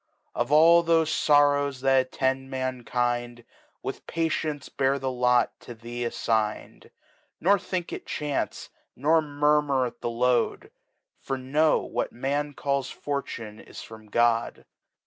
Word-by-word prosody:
Of 120 +3 -2
all 165 +3 +7
thofe 165 -1 +3
Sorrows 145 -3 +3
that 135 -1 +3
attend 135 0 -1
Mankind,.. 120 -2 -2 0.4
With - - -6
Patience 155 -3 -2
bear 135 0 0
the 135 -1 -2
Lot 125 -1 +2
to 120 - -10
thee 120 +2 -5
aflign'd; 110 -2 -2 0.5
Nor 200 +4 +3
think 180 -1 -4
it - - -7
Chance, 150 -2 -3 0.2
nor 160 +5 +3
murmur 145 -2 +1
at 120 - -8
the - - -2
Load; 120 +1 0 0.5
For 135 - -3
know, 145 +5 +2
what - - -3
Man 145 +3 -2
calls 140 -2 -1
Fortune, 115 -7 -5
is - - -11
from 110 -1 -13
God. 115 +1 +1
135 Hz, 130 wpm, -26 LUFS, 120-150 Hz, 0.5 s, all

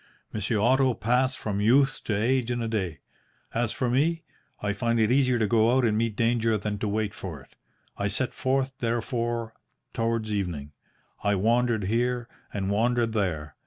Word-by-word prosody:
Monsieur 110 +1 -1
Otto 130 +3 +3
passed 125 +4 +1
from 100 -2 -2
youth 135 +5 +3
to 105 - -1
age 125 +2 +1
in 120 0 -1
a 115 - -2
day. 95 - -2 0.5
As 115 -1 0
for 125 - -1
me, 160 +7 +1 0.4
I 105 0 -1
find 115 +1 0
it 110 +1 +3
easier 130 -2 +3
to 110 - +2
go 115 +3 +3
out 130 - +3
and 110 -2 +2
meet 115 -1 0
danger 115 -1 +2
than 105 0 -3
to 110 - -1
wait 105 0 -1
for 90 -5 -7
it. 70 - -19 0.4
I - - +1
set - - -1
forth, 135 0 0
therefore, 115 -1 -2 0.4
towards 115 -1 -1
evening. 85 -8 -3 0.5
I 105 0 +2
wandered 115 +2 +2
here, 120 +4 0 0.2
and 100 -1 -2
wandered 115 +2 +2
there. 80 -8 -2
115 Hz, 175 wpm, -27 LUFS, 105-120 Hz, 0.5 s, Otto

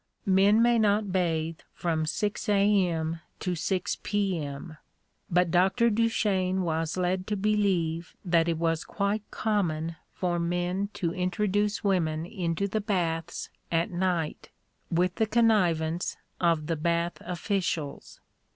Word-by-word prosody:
Men 200 +3 +5
may 240 -1 +4
not 210 -1 +2
bathe 165 -3 0 0.2
from 160 -2 -1
6 205 +6 -2
A.M. 185 -6 +2 0.2
to 180 - -1
6 185 +3 -1
P.M.; 165 -6 -2 0.5
but 180 -1 +2
Dr. 195 +7 +3
Duchesne 200 -4 +1
was 160 0 -1
led 185 +1 0
to 210 - 0
believe 190 -5 0
that 170 -2 +3
it 165 -1 0
was 165 0 0
quite 200 +1 -1
common 165 -7 -1
for 175 -2 -1
men 175 +3 -1
to 170 -2 -1
introduce 205 +3 0
women 165 -5 +1
into 175 +1 -2
the 215 +2 -1
baths 175 -5 -2 0.2
at 165 +2 +1
night, 175 -3 -1 0.4
with 180 +2 +1
the 220 -1 +2
connivance 180 -8 +2 0.2
of 165 -3 +2
the 165 +1 -1
bath 170 +2 -1
officials. 175 -4 -3
180 Hz, 125 wpm, -28 LUFS, 165-200 Hz, 0.5 s, Men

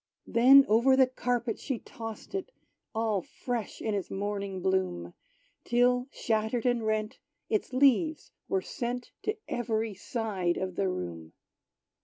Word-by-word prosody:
Then 270 +4 +7
over 235 +5 +5
the 265 0 +6
carpet 245 -2 -2
she 265 -4 -2
tossed 225 - -9
it, 390 +5 -3 0.4
All 220 -3 +1
fresh 240 +3 -5
in 220 - -2
its 200 -3 -2
morning 200 -1 -3
bloom, 185 - -1 0.5
Till, 245 +1 +3
shattered 220 -1 -1
and 245 -2 +2
rent, 215 0 -1 0.3
its 215 - 0
leaves 280 +4 +3 0.2
were 190 -1 +1
sent 245 0 -4
To 425 +1 -2
every 225 -2 -1
side 195 -3 -2
of 185 -1 -3
the 195 -1 +1
room. 85 - -5
225 Hz, 135 wpm, -29 LUFS, 195-250 Hz, 0.5 s, Then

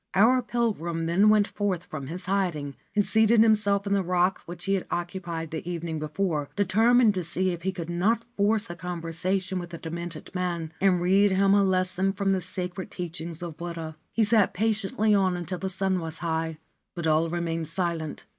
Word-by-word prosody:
Our 240 +6 +5
pilgrim 205 -9 -1
then 185 +6 +4
went 210 -1 +4
forth 190 -4 -2
from 140 -4 -6
his 175 +5 -6
hiding, 175 -8 -1 0.2
and 205 -1 +3
seated 220 0 +4
himself 210 -2 +3
on 200 - 0
the 200 - +3
rock 180 +1 +1
which 175 0 -7
he 195 - +1
had 195 - -1
occupied 175 -2 -4
the 160 +2 -5
evening 165 -2 -3
before, 155 -1 -2
determined 220 +4 +4
to 185 -2 -2
see 185 +3 -1
if 170 -1 -5
he 190 +2 -1
could 175 -3 -6
not 205 +7 +1
force 210 +2 +2
a - - -6
con 175 0 -5
versation 185 +3 -2
with 175 -1 -7
the 170 - -7
demented 170 0 -6
man 170 -3 -2
and 185 -3 +3
read 195 +3 +4
him 195 +1 +3
a 200 0 +5
lesson 185 0 +1
from 195 0 0
the 190 -1 +1
sacred 180 +1 -5
teachings 170 -1 -6
of 165 -3 -6
Buddha. 170 -2 -6 0.2
He 230 - +2
sat 215 -2 +3
patiently 215 0 +1
on 190 -3 +2
until 175 +1 -4
the 190 - -2
sun 190 0 0
was 165 0 -6
high; 160 -1 -2 0.4
but 170 -2 -3
all 160 +1 +3
remained 165 -1 -2
silent. 165 -2 -3
180 Hz, 195 wpm, -26 LUFS, 170-200 Hz, 0.4 s, Our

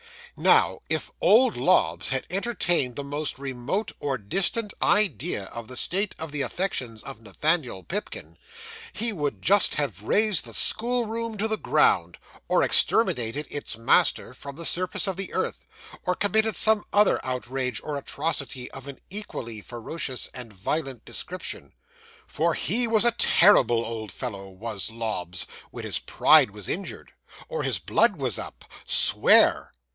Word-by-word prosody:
'Now, - - +3
if - - -2
old 245 +3 +5
Lobbs 160 +10 +2
had 130 -1 -2
entertained 175 - 0
the 140 - -4
most 145 +1 -2
remote 135 - -3
or 140 -2 -2
distant 195 - -2
idea 185 - +1
of 115 +3 -9
the 130 0 -6
state 195 +8 +2
of 160 -2 -7
the 145 -1 -3
affections 130 - -3
of 115 - -10
Nathaniel 125 - -1
Pipkin, 205 +4 -6 0.6
he 230 -1 0
would 145 - -3
just 200 +2 +5
have 125 -10 -2
razed 205 - +2
the 115 - -11
school 240 - +2
room 225 0 -4
to 215 +2 0
the 220 0 -1
ground, 90 - +2 0.3
or - - +2
exterminated 125 +5 +4
its 145 -5 -4
master 115 +1 +2
from 140 +2 -9
the 170 +2 -7
surface 180 +3 -1
of 190 -2 -3
the 195 - -5
earth, - - -3 0.4
or 180 - +1
committed 220 +2 +1
some 220 -1 +3
other 205 0 +3
outrage 125 -1 -3
and 150 - -3
atrocity 140 -3 -3
of 135 0 -10
an 140 -2 -9
equally 120 - -6
ferocious 125 +4 -5
and 125 -3 -9
violent 130 - -4
description; 185 +1 -6 0.5
for - - -1
he 245 +1 0
was 225 0 +3
a 240 - +5
terrible 130 - +4
old 110 -3 -6
fellow, 100 -4 -6
was 100 +2 -4
Lobbs, 110 -6 -3 0.2
when - - -9
his - - 0
pride - - +4
was 105 -1 -3
injured, 195 +2 -5 0.4
or 485 -1 -3
his - - 0
blood 215 -2 +2
was 130 - -1
up. - - -9 0.2
Swear! - - +4
140 Hz, 150 wpm, -25 LUFS, -, 0.6 s, old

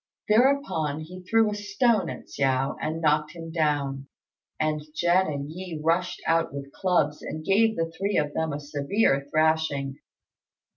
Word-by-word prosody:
Thereupon 215 - +2
he 180 +4 -9
threw 220 +3 +2
a - - -3
stone 205 -1 +1
at - - -7
Hsiao 135 0 0
and 160 +1 -2
knocked 150 0 +2
him 165 -1 -7
down; 145 -4 -1 0.5
and 155 -1 0
Jen 175 +3 +3
and 145 -1 -4
Yi 175 -2 -6
rushed 165 +3 0
out 165 0 +2
with 140 0 -7
clubs 155 -6 +1
and 155 0 -6
gave 220 +3 +3
the 165 0 -2
three 200 +3 -1
of 150 -1 0
them 160 -1 -1
a 145 - -3
severe 145 0 0
thrashing. 155 -3 +1
160 Hz, 155 wpm, -26 LUFS, 145-185 Hz, 0.5 s, Jen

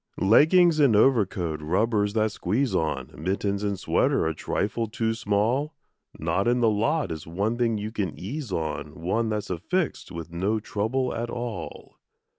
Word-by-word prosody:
Leggings 155 - +5
and 135 -7 +5
overcoat, 95 - +2
rubbers 105 +5 +1
that 110 -1 +1
squeeze 115 +8 -1
on, 75 -5 -1
Mittens 100 +4 -1
and 100 -2 -1
sweater 95 - +1
a 80 - 0
trifle 105 +7 -2
too 110 +1 -1
small; 115 +8 0 0.4
Not 85 +6 0
in 120 +1 +3
the 115 -2 +4
lot 115 - 0
is 80 -1 -6
one 100 +7 -1
thing 115 -2 +1
you 105 +1 -4
can 100 -8 -3
ease 125 - -5
on, 80 -3 -4
One 110 +7 0
that's 105 -3 -3
affixed 165 - -2
with 85 -1 -7
no 95 +6 0
trouble 115 +5 -1
at 120 0 -3
all. 120 -2 -6
105 Hz, 160 wpm, -26 LUFS, 90-120 Hz, 0.4 s, Leggings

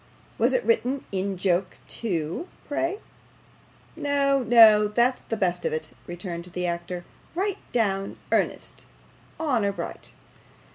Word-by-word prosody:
Was - - +3
it - - +2
written 280 - +1
in 195 0 -2
joke, 180 0 0
too, 180 - -2 0.2
pray?' 335 +6 -1 1.0
'No, 280 -3 +2
no, 220 -3 +7
that's 240 +4 +2
the 225 - -4
best 180 -3 0
of - - 0
it,' 155 - -3 0.2
returned 175 -1 -5
the 180 0 -4
actor; 175 +1 -3 0.3
'right 390 +2 -1
down 195 -4 0
earnest - - -1 0.5
honour 245 -11 +1
bright. - - -6
210 Hz, 125 wpm, -26 LUFS, 180-275 Hz, 1.0 s, no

